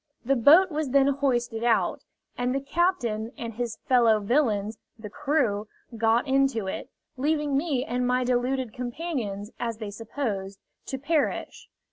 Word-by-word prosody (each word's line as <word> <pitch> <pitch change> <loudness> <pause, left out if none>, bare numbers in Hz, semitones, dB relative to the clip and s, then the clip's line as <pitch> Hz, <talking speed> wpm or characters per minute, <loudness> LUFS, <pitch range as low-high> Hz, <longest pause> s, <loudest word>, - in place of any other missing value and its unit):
The 275 +3 +3
boat 320 +10 +6
was 300 -2 -2
then 275 +1 +4
hoisted 245 -5 0
out, 235 -2 +2 0.3
and 250 +1 -1
the - - +1
captain 270 - 0
and 230 -1 -5
his 235 -1 -4
fellow 235 -4 +4
villains, 215 -2 0 0.2
the 215 -2 -9
crew, 225 -9 0 0.3
got 225 +4 +2
into 270 -5 +2
it, 190 +6 -5 0.3
leaving 295 +1 0
me 275 -3 0
and 245 0 -1
my 250 0 +2
deluded 250 -1 0
companions, 245 - -4
as 230 -2 -3
they 215 -2 -6
supposed, 205 -3 -4 0.3
to 265 - -3
perish. 295 +3 -1
245 Hz, 145 wpm, -26 LUFS, 225-275 Hz, 0.3 s, boat